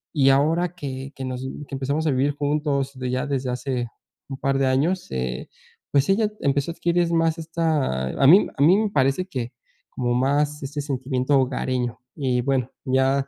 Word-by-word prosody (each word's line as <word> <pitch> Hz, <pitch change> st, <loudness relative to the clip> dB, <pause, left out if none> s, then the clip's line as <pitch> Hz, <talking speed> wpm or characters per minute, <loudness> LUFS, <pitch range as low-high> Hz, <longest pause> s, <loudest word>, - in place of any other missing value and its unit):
Y 135 Hz, -2 st, +5 dB
ahora 160 Hz, +6 st, +2 dB
que 135 Hz, -4 st, -6 dB
que 135 Hz, -, -5 dB
nos 130 Hz, -1 st, -4 dB
que 135 Hz, +1 st, -6 dB
empezamos 140 Hz, +4 st, -1 dB
a -, -, +3 dB
vivir 135 Hz, +2 st, +2 dB
juntos, 145 Hz, -1 st, -1 dB
de 125 Hz, -1 st, -2 dB
ya 130 Hz, +2 st, -1 dB
desde 135 Hz, -2 st, -2 dB
hace 125 Hz, -1 st, -2 dB, 0.4 s
un 135 Hz, -, -5 dB
par 135 Hz, 0 st, 0 dB
de 135 Hz, -, +2 dB
años, 155 Hz, +8 st, +1 dB
eh, 65 Hz, -1 st, -3 dB, 0.4 s
pues, 140 Hz, -1 st, +3 dB
ella 210 Hz, +2 st, +3 dB
empezó 140 Hz, +3 st, +1 dB
a -, -, -7 dB
adquirir 170 Hz, 0 st, +1 dB
más 165 Hz, 0 st, +2 dB
esta 155 Hz, -, -1 dB
a 135 Hz, -, +2 dB
mí 185 Hz, +8 st, +7 dB
a -, -, -1 dB
mí 175 Hz, +6 st, +6 dB
me 215 Hz, 0 st, +1 dB
parece 135 Hz, +1 st, +1 dB
que, 125 Hz, -9 st, -4 dB, 0.4 s
como 120 Hz, -1 st, -1 dB
más 145 Hz, +4 st, +1 dB
este 145 Hz, +2 st, -4 dB
sentimiento 130 Hz, -1 st, 0 dB
hogareño 125 Hz, -2 st, -1 dB, 0.2 s
y, 130 Hz, -5 st, 0 dB
bueno, 130 Hz, -1 st, 0 dB
ya 135 Hz, +1 st, +2 dB
135 Hz, 185 wpm, -23 LUFS, 130-150 Hz, 0.4 s, mí